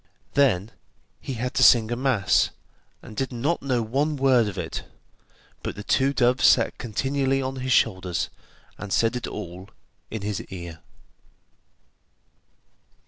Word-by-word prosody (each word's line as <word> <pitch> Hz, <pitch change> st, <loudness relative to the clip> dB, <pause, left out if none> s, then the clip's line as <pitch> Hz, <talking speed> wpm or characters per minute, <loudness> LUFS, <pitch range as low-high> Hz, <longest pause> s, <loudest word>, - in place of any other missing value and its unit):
Then 115 Hz, -7 st, +2 dB, 0.5 s
he 135 Hz, -, -5 dB
had 125 Hz, +2 st, -3 dB
to -, -, +2 dB
sing 115 Hz, -2 st, +6 dB
a -, -, +1 dB
mass, 120 Hz, -6 st, +2 dB, 0.5 s
and 110 Hz, -, -11 dB
did 135 Hz, +4 st, -2 dB
not 140 Hz, +8 st, -1 dB
know 125 Hz, -4 st, 0 dB
one 140 Hz, +7 st, 0 dB
word 130 Hz, -5 st, +3 dB
of 100 Hz, -2 st, -5 dB
it, -, -, -4 dB, 0.8 s
but -, -, -4 dB
the 105 Hz, -, -7 dB
two 135 Hz, +5 st, +2 dB
doves 125 Hz, -1 st, +2 dB
sat -, -, +4 dB
continually 135 Hz, +3 st, 0 dB
on 135 Hz, 0 st, -3 dB
his 130 Hz, 0 st, -3 dB
shoulders, 95 Hz, -7 st, +1 dB, 0.5 s
and 105 Hz, -1 st, -7 dB
said 115 Hz, +4 st, +2 dB
it 125 Hz, -, -3 dB
all 90 Hz, +3 st, -7 dB, 0.4 s
in 110 Hz, -3 st, -5 dB
his 105 Hz, -2 st, -2 dB
ear. 85 Hz, -3 st, -8 dB
120 Hz, 140 wpm, -25 LUFS, 105-135 Hz, 0.8 s, sing